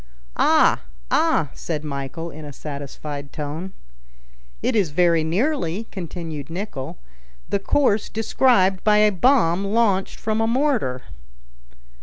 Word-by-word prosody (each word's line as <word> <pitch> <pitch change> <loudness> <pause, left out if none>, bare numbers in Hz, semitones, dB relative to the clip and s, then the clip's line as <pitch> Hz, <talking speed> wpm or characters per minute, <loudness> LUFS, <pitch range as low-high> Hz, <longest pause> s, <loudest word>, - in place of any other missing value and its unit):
"Ah! - - +4 0.3
ah!" 155 -4 +2
said 155 -3 -4
Michel, 150 +3 -5
in 155 0 -10
a 145 - -7
satisfied 145 0 -7
tone. 155 +5 -5 0.9
"It - - +1
is 200 -7 +2
very 170 +1 +3
nearly," 200 - 0
continued 165 -6 -6
Nicholl, 165 -6 -5 0.5
"the 200 - +1
course 215 -1 +1
described 215 -4 +2
by 210 0 +4
a 210 0 +5
bomb 195 -4 +3
launched 200 -2 +1
from 220 0 -1
a 225 - +2
mortar." 235 - 0
180 Hz, 120 wpm, -22 LUFS, 150-215 Hz, 0.9 s, a